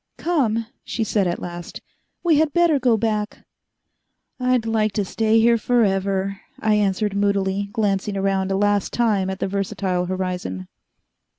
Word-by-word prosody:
"Come," 240 -10 0 0.2
she 230 - -2
said 205 -3 +1
at 175 - -1
last, 175 0 -7 0.4
"we 330 -4 +4
had 310 -2 +1
better 340 -4 +3
go 245 -3 +3
back." 215 -1 -2 0.9
"I'd 250 -2 +1
like 215 -2 +1
to 205 - 0
stay 220 +3 +2
here 230 +1 +4
forever," 195 -3 0 0.2
I 215 0 +2
answered 205 0 +1
moodily, 200 0 0
glancing 205 -2 -1
around 195 0 0
a 195 - +1
last 205 -1 +1
time 210 -5 +1
at 190 - -3
the - - -2
versatile 190 -2 -2
horizon. 180 - -3
205 Hz, 150 wpm, -22 LUFS, 190-225 Hz, 0.9 s, we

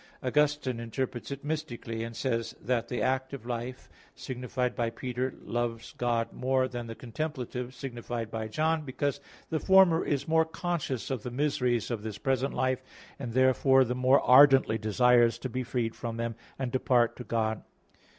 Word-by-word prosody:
Augustine 145 -2 +1
interprets 120 +1 -4
it 140 0 -6
mystically, 120 -7 -4
and 115 0 -6
says 115 -3 -2
that 120 -2 -1
the 125 - -2
active 130 -1 -1
life, 120 +1 -5 0.3
signified 125 0 -3
by 115 -1 0
Peter, 125 +2 -3
loves 120 -1 -3
God 120 -2 0
more 130 0 +1
than 120 -2 -6
the 115 - -6
contemplative 125 -1 -5
signified 120 -3 -5
by 110 -1 -3
John, 155 +8 +1
because 140 0 -2 0.3
the 160 - +1
former 190 -3 +5
is 140 -2 -1
more 160 0 +4
conscious 160 -6 -3
of 130 -4 -2
the 125 - -5
miseries 125 -3 0
of 115 -3 -2
this 110 -2 -5
present 135 0 0
life, 130 0 0 0.4
and 120 -4 -5
therefore 130 +1 +5
the 125 0 -1
more 130 +2 +4
ardently 130 -3 +6
desires 120 +2 +4
to 130 - -5
be 130 +2 -2
freed 120 -2 -2
from 115 -1 -5
them, 115 0 -2 0.2
and 130 -2 -3
depart 125 -2 +2
to 125 - -6
God. 110 -2 -1
125 Hz, 165 wpm, -29 LUFS, 115-135 Hz, 0.4 s, ardently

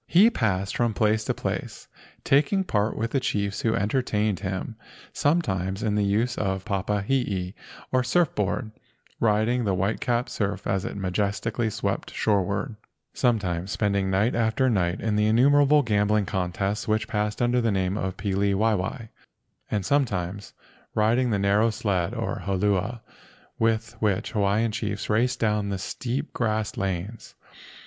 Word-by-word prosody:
He 200 +8 +6
passed 100 - -1
from 120 -3 +1
place 110 +1 +2
to - - 0
place, - - -4 0.4
taking 150 +8 +3
part 105 - 0
with 115 +1 -2
the 135 - +2
chiefs 100 -5 -1
who 115 -1 +1
entertained 105 -2 0
him 95 +3 -4 0.4
sometimes 95 - 0
in 105 -2 +1
the 105 0 +2
use 110 +5 0
of 95 -2 -1
the - - -29
papa 100 0 -1
hee, 100 -7 -1 0.4
or 130 0 +2
surf 150 +6 +2
board, 105 +2 -1 0.5
riding 110 +3 +2
the 100 -3 +1
white 95 +4 -1
capped 120 -1 0
surf 100 -1 -2
as 95 -1 0
it - - -5
majestically 100 +4 -1
swept - - -3
shoreward—sometimes 100 -2 -1
spending 100 -3 0
night 100 +5 +2
after 115 +3 +2
night 90 -4 0
in 110 -2 0
the 105 0 +3
innumerable 145 +5 +5
gambling 105 -2 +2
contests 95 +2 -2
which 110 -1 +1
passed 105 -2 -1
under 120 0 +2
the 115 - +1
name 95 -1 0
pili 100 0 -1
waiwai—and 110 0 -3
some¬ 140 +5 +2
times 95 0 -4 0.4
riding 115 +4 +2
the 105 - +1
narrow 100 +3 +3
sled, 95 -5 -1
or - - -3
holua, 100 +4 0 0.6
with 115 0 +1
which 105 -4 0
Hawaiian 105 +2 +1
chiefs 105 -1 -3
raced 125 +4 +1
down 105 -2 +1
the 100 - -2
steep 125 +9 -4
grassed 110 -3 -1
lanes. 95 +3 -4
105 Hz, 150 wpm, -25 LUFS, 100-115 Hz, 0.6 s, He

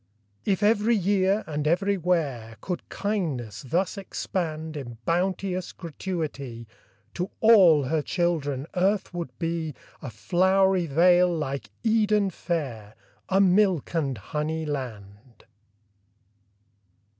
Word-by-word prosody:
If 195 -1 +1
every 215 +2 +3
year 195 +1 +2
and 150 -1 -2
everywhere 170 - 0
Could 180 +8 -5
kindness 155 - -3
thus 185 - 0
expand 160 -5 -4
In 120 -5 -7
bounteous 185 +1 -1
gratuity, 145 -8 -5 0.5
To 180 +3 -3
all 190 -10 +7
her 155 +4 0
children 145 -5 -1
earth 190 +1 +1
would 170 -4 -4
be 165 -2 -3 0.3
A 140 - -6
flowery 185 - +2
vale 175 +4 +5
like 140 -5 -3
Eden 210 -3 +2
fair, 130 - -4 0.3
A 190 0 +3
milk 190 -4 +3
and 140 -7 -1
honey 155 +8 -3
land. 120 -5 -7
170 Hz, 105 wpm, -26 LUFS, 140-190 Hz, 0.5 s, all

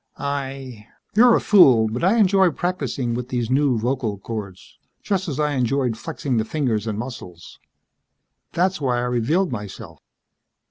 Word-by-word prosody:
"I 135 -5 -5
..." - - -43
"You're 235 +1 +6
a - - +3
fool, 130 - +5
but 115 +6 -4
I 195 +6 +3
enjoy 190 -3 +4
practicing 140 -8 -3
with 125 +1 -4
these 120 -2 -2
new 135 -2 +2
vocal 115 -2 -2
chords, 100 -2 -8 0.2
just 195 -1 -1
as 145 -1 -4
I 150 -1 +1
enjoyed 130 -2 0
flexing 135 -1 -3
the 110 - +1
fingers 115 -4 -2
and 105 -2 -3
muscles. 110 -8 -9 0.9
That's 185 -1 0
why 125 -3 0
I - - 0
revealed 125 +10 0
myself. 105 -5 -8
130 Hz, 155 wpm, -22 LUFS, 115-155 Hz, 0.9 s, You're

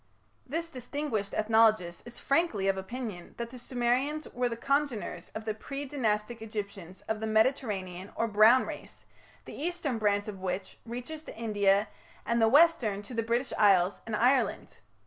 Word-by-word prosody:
" 100 0 -39
This 330 +1 -2
distinguished 250 -5 -3
ethnologist 215 -5 +3
is 240 - -9
frankly 275 - +1
of 195 - +3
opinion 195 -2 -6
that 235 0 -5
the 255 - -9
Sumerians 255 +5 0
were 245 0 0
the 230 - -4
congeners 275 -3 -1
of 220 0 -5
the 215 - -1
pre 275 +6 -6
Dynastic 230 -4 -1
Egyptians 200 -4 -6
of 220 -1 -3
the 220 - -3
Mediterranean 210 -5 0
or 230 - 0
Brown 220 +4 +6
race, - - -9 0.4
the - - -9
eastern 315 -6 -2
branch 205 -1 +1
of 200 -3 -6
which 185 +1 -4
reaches 250 +7 -6
to - - -10
India 205 -2 +2 0.4
and 235 0 +1
the 225 - +6
western 245 -9 +4
to 225 - -10
the 230 - 0
British 235 +3 -1
Isles 195 -3 +4
and 220 - -1
Ireland. 255 +4 +1
225 Hz, 165 wpm, -29 LUFS, 205-255 Hz, 0.4 s, Brown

